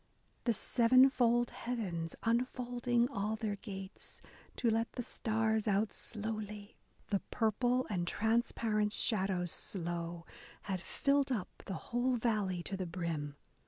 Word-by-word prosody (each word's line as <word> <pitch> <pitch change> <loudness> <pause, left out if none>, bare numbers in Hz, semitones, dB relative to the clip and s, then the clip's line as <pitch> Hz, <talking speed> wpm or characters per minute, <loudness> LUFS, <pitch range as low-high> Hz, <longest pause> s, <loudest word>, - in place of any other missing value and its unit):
The 235 - +4
sevenfold 240 +1 +4
heavens 185 -9 -3
unfolding 240 0 +1
all 210 -1 -1
their 215 -2 -2
gates 195 -2 -8 0.4
To 235 - +2
let 225 +1 0
the 245 - -3
stars 220 -1 +1
out 205 +1 +2
slowly... 210 -2 -5 0.3
The 200 - +2
purple 245 +3 +2
and 175 -4 -1
transparent 220 -1 +1
shadows 190 -7 +1
slow 170 -2 -3 0.4
Had 190 -3 -2
filled 275 +6 +1
up 215 -7 -1 0.2
the 190 - -2 0.2
whole 250 +1 +3
valley 210 -6 0
to 195 - -3
the 185 -2 -3
brim. 165 -4 -3
215 Hz, 125 wpm, -34 LUFS, 190-240 Hz, 0.4 s, The